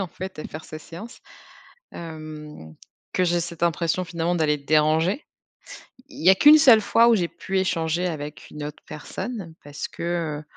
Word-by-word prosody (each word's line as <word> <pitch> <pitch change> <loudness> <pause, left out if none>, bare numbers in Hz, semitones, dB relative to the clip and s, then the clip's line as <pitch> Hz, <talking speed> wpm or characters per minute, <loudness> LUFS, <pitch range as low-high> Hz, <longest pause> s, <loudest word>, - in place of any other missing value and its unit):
en 195 - -1
fait, 185 +1 -8
à - - -6
faire 155 +1 -8
sa 155 - -8
séance. 180 +10 -11 0.7
Hem, 155 - -9 0.4
que 185 - +2
j'ai 175 -1 +2
cette 170 0 -5
impression 170 +1 0
finalement 170 0 -1
d'aller 155 -3 +1
déranger. 155 - +2 0.8
Il - - -10
y - - +8
a 190 - +8
qu' 290 - +3
1 305 - +10
seule 240 -6 +7
fois 230 +3 +4
où 235 - +6
j'ai 175 -5 0
pu 190 - -4
échanger 170 -2 0
avec 150 -3 -6
une 150 - -7
autre 150 0 -9
personne 185 +3 -6
parce 145 +1 -6
que, 165 -3 -3
heu, - - -16
170 Hz, 180 wpm, -24 LUFS, 155-185 Hz, 0.8 s, 1